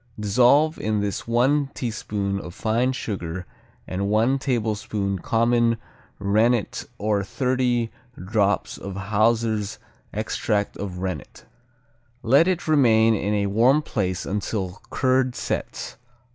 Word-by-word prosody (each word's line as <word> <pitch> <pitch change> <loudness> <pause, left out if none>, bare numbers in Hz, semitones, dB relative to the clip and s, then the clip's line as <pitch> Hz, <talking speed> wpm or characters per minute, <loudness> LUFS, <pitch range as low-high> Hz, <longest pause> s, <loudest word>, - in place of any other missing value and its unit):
Dissolve 125 +9 +4
in 110 0 0
this 100 +1 -3
one 135 +5 +2
teaspoon 105 -4 -2
of 85 -2 -9
fine 120 +3 +1
sugar 90 -8 -4 0.4
and 100 +2 -2
one 115 +6 +2
tablespoon 105 -6 -1
common 115 +2 +2 0.4
rennet 110 +3 +1
or 105 -1 0
thirty 125 0 0 0.3
drops 105 +2 0
of 100 -1 -6
Hauser's 110 +1 +1 0.3
extract 105 -1 -1
of 95 -3 -5
rennet. 90 -8 -5 0.8
Let 140 +9 +5
it 180 -3 -1
remain 115 -7 +5
in 105 0 0
a 100 -1 +1
warm 120 +9 +3
place 95 - -2
until 100 -2 -3
curd 130 -1 +1
sets. - - -4
110 Hz, 115 wpm, -24 LUFS, 100-125 Hz, 0.8 s, Let